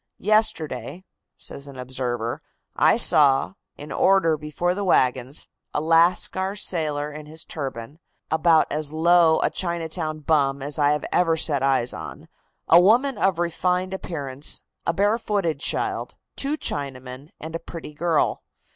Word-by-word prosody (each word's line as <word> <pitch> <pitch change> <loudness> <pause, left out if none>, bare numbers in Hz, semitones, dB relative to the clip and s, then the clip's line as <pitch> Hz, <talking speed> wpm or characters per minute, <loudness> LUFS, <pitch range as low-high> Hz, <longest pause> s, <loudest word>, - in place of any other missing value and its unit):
"Yesterday," 185 - -1 0.3
says 140 +1 -10
an 140 -2 -11
observer, 125 -2 -3 0.3
"I - - +4
saw, 140 +2 +5 0.2
in 145 +1 -9
order 190 -4 +3
before 150 +4 -2
the 200 +2 -3
wagons, 130 -6 +1 0.3
a - - +2
Lascar 170 +4 +2
sailor 150 -7 -1
in 150 0 -9
his 160 +2 -9
turban, 135 -1 -6 0.3
about 160 0 +4
as 150 -1 -2
low 165 0 +4
a - - +1
Chinatown 165 -3 -3
bum 140 -3 +1
as 145 +3 -3
I 145 +1 +3
ever 165 -2 +2
set 145 -3 -1
eyes 135 -3 +1
on, - - -9 0.4
a 170 - +7
woman 240 +5 +3
of 190 -3 +2
refined 180 +2 -1
appearance, 145 -7 -4 0.2
a - - +4
barefooted 200 -5 0
child, - - -1 0.2
two 285 +3 -1
Chinamen, 135 - -5
and 160 +1 -8
a - - -2
pretty 165 -3 -9
girl. 165 +1 0
160 Hz, 140 wpm, -23 LUFS, 140-175 Hz, 0.4 s, a